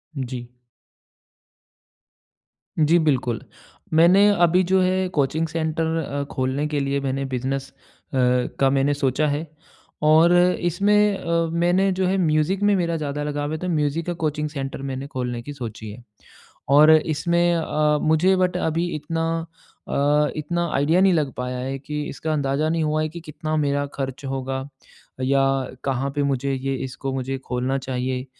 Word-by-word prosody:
जी 125 -2 -5 2.3
जी, 160 +2 +4
बिल्कुल। 130 -7 0 0.5
मैंने 180 +6 +6
अभी 180 +2 +4
जो 190 0 +4
है, 185 0 +1
कोचिंग 155 0 0
सेंटर 160 0 -1
अ, 140 0 -3
खोलने 130 +3 -1
के 150 -1 -1
लिए 140 0 0
मैंने 135 0 -2
बिज़नेस 135 +1 -3
अ, - - -31 0.4
का 125 +1 +2
मैंने 140 +1 +2
सोचा 140 +2 0
है 145 +3 -2 0.6
और 160 +3 +6 0.3
इसमें 200 +4 +2
अ, 170 0 0
मैंने 175 +3 +2
जो 185 0 0
है, 195 +1 +1
म्यूज़िक 165 +3 +1
में 205 0 +4
मेरा 170 -3 0
ज़्यादा 150 -1 -3
लगाव 145 0 -3
है, 155 - -2
तो 180 +3 -4
म्यूज़िक 155 0 0
का 175 - -1
कोचिंग 150 0 -1
सेंटर 135 -2 -5
मैंने 135 +1 -5
खोलने 125 -3 -4
की 145 +5 -8
सोची 115 -5 -7
है। 115 +3 -12 0.7
और 150 +3 +7
इसमें 170 +3 +1
अ, 150 -2 +1
मुझे 160 +5 +3
बट 180 -1 +1
अभी 165 0 0
इतना 165 +2 -2 0.6
अ, 145 +1 +2
इतना 170 +3 -2
आइडिया 155 +6 +3
नहीं 190 -1 +5
लग 150 -5 0
पाया 125 0 -3
है 135 +2 -3
कि 150 +2 -4
इसका 155 +2 -3
अंदाज़ा 145 +1 0
नहीं 165 0 0
हुआ 155 0 0
है 155 - -1
कि 170 - -8
कितना 155 0 -4
मेरा 145 -1 0
खर्च 135 0 -5
होगा 135 0 -3 0.6
या 135 +1 +3 0.4
कहाँ 135 0 -1
पे 145 - +1
मुझे 140 0 0
ये 135 +1 -2
इसको 135 +1 -5
मुझे 135 0 -3
खोलना 130 +2 -1
चाहिए 130 -1 -3
150 Hz, 160 wpm, -23 LUFS, 135-165 Hz, 2.3 s, और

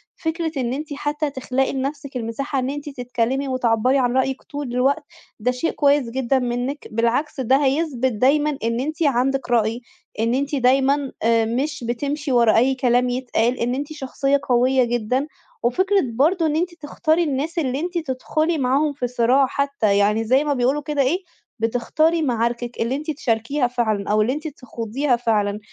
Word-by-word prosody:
فكرة 325 -1 -2
إن 250 -2 -1
أنتِ 295 +2 -5
حتى 295 +1 -2
تخلقي 265 -1 -1
لنَفْسِك 275 +1 -4
المساحة 245 +4 -3
إن 255 0 -1
أنتِ 290 +1 -5
تتكلمي 250 0 -2
وتعبّري 255 0 +2
عن 250 -1 +1
رأيِك 265 0 0
طُول 285 -5 -6
الوقت، 275 +5 +2 0.4
ده 245 +4 +1
شيء 250 +6 -1
كويس 285 -4 +2
جدًا 265 +2 0
منِك، 250 +3 -3
بالعكس 235 +7 0
ده 265 +3 +3
هيثبْت 265 -3 +1
دايمًا 280 +6 +2
إن 230 +1 0
أنتِ 310 +5 -2
عندِك 270 -1 +1
رأي، 230 0 +1 0.4
إن 230 +2 +1
أنتِ 280 +3 -1
دايمًا 270 +2 +2
آآ 230 0 +3
مش 265 +5 -2
بتمشِي 285 +4 -2
ورا 235 -3 +4
أي 260 +3 +3
كلام 250 -1 +2
يتقال، 245 -1 0
إن 245 +2 0
أنتِ 290 +3 -4
شخصية 275 0 0
قوية 255 +1 +4
جدًا، 240 +3 -1 0.4
وفكرة 375 +11 +2
برضه 325 +8 +2
إن 305 -1 +1
أنتِ 345 +2 -1
تختاري 315 +1 0
الناس 305 +3 -2
اللي 265 -3 -1
أنتِ 350 +2 -3
تدخُلي 310 +2 -1
معاهم 280 +3 +1
في 250 -3 -2
صراع 250 +3 +3
حتى 280 -7 0
يعني 210 +2 +2
زَي 260 +6 +3
ما 295 -1 0
بيقولوا 265 +3 +1
كده 295 -1 -1
إيه، 335 +9 +1 0.4
بتختاري 250 +9 +1
معاركِك 240 -2 -1
اللي 230 +3 0
أنتِ 305 +3 -3
تشاركيها 250 -1 0
فعلًا 220 -5 -1
أو 215 0 +3
اللي 235 +4 +1
أنتِ 305 +3 -5
تخوضيها 250 -1 -2
فعلًا، 210 -3 0
265 Hz, 170 wpm, -22 LUFS, 240-290 Hz, 0.4 s, ورا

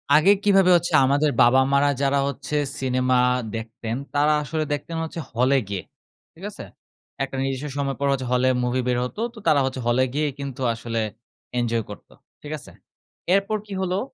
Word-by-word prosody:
আগে 155 +6 +6
কিভাবে 195 -2 +5
হচ্ছে 170 0 0
আমাদের 145 +2 +2
বাবা 125 +3 +5
মারা 140 +1 +4
যারা 140 0 +2
হচ্ছে 140 +2 -4 0.2
সিনেমা 130 -1 +1 0.4
দেখতেন 115 0 -5 0.2
তারা 150 +1 +4
আসলে 155 +2 -2
দেখতেন 165 +3 -4
হচ্ছে 160 +1 -6
হলে 130 +4 +3
গিয়ে। 100 -2 -3 0.5
ঠিক - - -11
আছে? - - -9 0.6
একটা 135 0 -5
নির্দিষ্ট 135 +1 -2
সময় 135 -1 -1
পরে 140 0 +1
হচ্ছে 130 -2 -3
হলে 125 +1 +3 0.2
মুভি 125 +1 0
বের 125 -1 +1
হত। 125 - -6 0.2
তো - - -17
তারা 155 -3 +5
হচ্ছে 130 -1 -3
হলে 120 +2 +3
গিয়ে 150 +1 +1
কিন্তু 140 -1 -6
আসলে 115 0 -3 0.6
এনজয় 115 -1 0
করত 105 - -11 0.3
ঠিক 150 - -8
আছে? - - -13 0.6
এরপর 200 +2 +1
কি 205 - -7
হলো? 185 0 0
135 Hz, 175 wpm, -23 LUFS, 125-150 Hz, 0.6 s, আগে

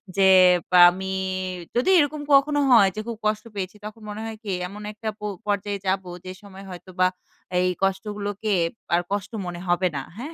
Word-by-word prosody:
যে 195 -1 +4 0.5
আ - - +8
আমি 190 +2 -5 0.6
যদি 245 +8 +2
এরকম 295 0 0
কখনো 290 +1 +4
হয় 205 -5 +7
যে - - -4
খুব 230 -2 -4
কষ্ট 215 0 0
পেয়েছি। 190 0 -4
তখন 215 +1 -9
মনে 210 +1 -6
হয় 225 -1 -6
কি? 205 - -4 0.2
এমন 205 +3 -10
একটা 220 +1 -5
পো 210 - -6 0.2
পর্যায়ে 205 0 -1
যাবো 190 -1 -1 0.2
যে 185 - -6
সময় 195 -1 -12
হয়তোবা 185 0 -1 0.5
এই 180 - +2 0.2
কষ্টগুলোকে 205 +2 -2 0.4
আর 175 - +2
কষ্ট 200 +1 -2
মনে 175 -1 -6
হবে 175 +1 +2
না। 140 - -2 0.2
হ্যাঁ? 285 +8 -7
200 Hz, 180 wpm, -24 LUFS, 190-220 Hz, 0.6 s, আ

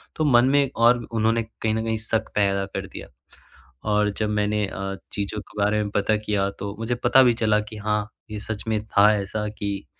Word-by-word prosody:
तो 155 - 0
मन 120 -4 +5
में 140 -1 +3
और 120 +1 +4
उन्होंने 115 0 +1
कहीं 110 0 -3
न 110 - -1
कहीं 110 0 0
शक 110 0 -2
पैदा 100 -1 +2
कर 95 - -6
दिया। - - -9 0.8
और 105 0 +2
जब 110 -1 0
मैंने 105 0 0
अ, 95 0 -5 0.2
चीज़ों 105 +1 -3
के 105 - -14
बारे 105 +1 +2
में 100 - -4
पता 105 +1 +2
किया 105 -2 -1
तो 100 0 -5
मुझे 115 +2 -1
पता 120 +2 +5
भी 120 -2 +4
चला 110 -2 +2
कि 105 +1 -9
हाँ 105 0 -1 0.2
ये 105 - -5
सच 110 -1 -5
में 110 -1 +1
था 105 0 +5
ऐसा 105 +2 -3
कि 100 -1 -4
105 Hz, 210 wpm, -24 LUFS, 105-115 Hz, 0.8 s, मन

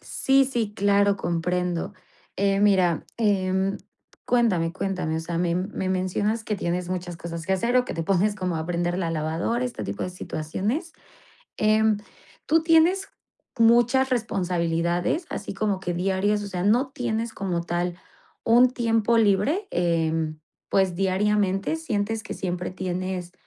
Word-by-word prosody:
Sí, 270 0 +2
sí, 235 -5 -2
claro, 200 0 +3
comprendo. 180 0 -1 0.4
Eh, 195 0 +2
mira, 185 -5 +3
em, 195 -3 +1 0.5
cuéntame, 200 -9 +2
cuéntame, 185 -4 -2
o - - -1
sea, 165 +1 -4
me 170 -1 +1
me 185 +1 -2
mencionas 190 +4 -1
que 210 -2 -2
tienes 175 0 -2
muchas 180 -1 -4
cosas 170 0 -7
que 190 - +1
hacer 235 +7 +1
o 250 - +4
que - - -5
te 165 - -2
pones 195 +4 +2
como 180 -4 -2
a 160 - -3
prender 175 0 -1
la 170 -3 -1
lavadora, 165 +10 -1
este 245 - -4
tipo 100 0 -4
de - - -3
situaciones. 200 - -3 0.7
Em, 215 0 +3 0.5
¿tú 325 +1 +3
tienes 335 +4 +4 0.5
muchas 240 +3 +4
responsabilidades? 175 - 0
¿Así 200 - -5
como 200 -1 -1
que 180 -2 -3
diarias?, 195 +3 0
o - - -5
sea, 180 -2 -3
¿no 240 +7 +3
tienes 230 -3 -3
como 180 -3 -2
tal 175 +1 -2 0.5
un 240 +2 +5
tiempo 230 -2 +2
libre?, 225 - +2
em, 165 -2 0 0.3
pues, 190 -2 +2
¿diariamente 195 - +1
sientes 225 -8 -2
que - - -6
siempre 180 -1 -3
tienes 185 -1 -4
195 Hz, 150 wpm, -25 LUFS, 175-225 Hz, 0.7 s, un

